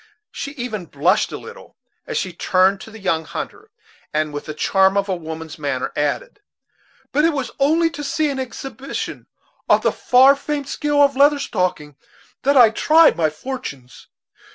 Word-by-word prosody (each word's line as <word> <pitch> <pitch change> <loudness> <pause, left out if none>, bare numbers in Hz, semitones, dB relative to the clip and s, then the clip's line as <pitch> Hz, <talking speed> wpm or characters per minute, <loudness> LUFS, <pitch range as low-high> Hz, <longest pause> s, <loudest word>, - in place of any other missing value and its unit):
She 280 - -6
even 230 - -5
blushed 180 +10 +1
a - - -5
little 470 +2 -13 0.3
as - - -3
she 185 - -2
turned 190 +3 +2
to - - -10
the 220 - -11
young 180 -6 -1
hunter, 150 - -7 0.4
and 155 0 -1
with 145 - -5
the 155 - -6
charm 190 +4 +2
of 200 0 +1
a 190 - -1
woman's 160 -2 -8
manner 140 -3 -3
added: 420 - -2 0.7
"But 295 - +2
it 330 0 +3
was 275 -3 -3
only 325 +4 +3
to 295 -1 -7
see 300 +1 0
an 270 - -4
exhibition 260 +1 -6 0.4
of - - +4
the - - +3
far 260 +3 +5
famed 285 0 -4
skill 290 -1 +1
of 280 -1 +2
Leather 285 +2 +5
Stocking, 175 - -2 0.4
that 280 +1 +2
I 235 -4 +7
tried 315 +8 +5
my 160 -2 +1
fortunes. 155 - -8
225 Hz, 175 wpm, -20 LUFS, -, 0.7 s, I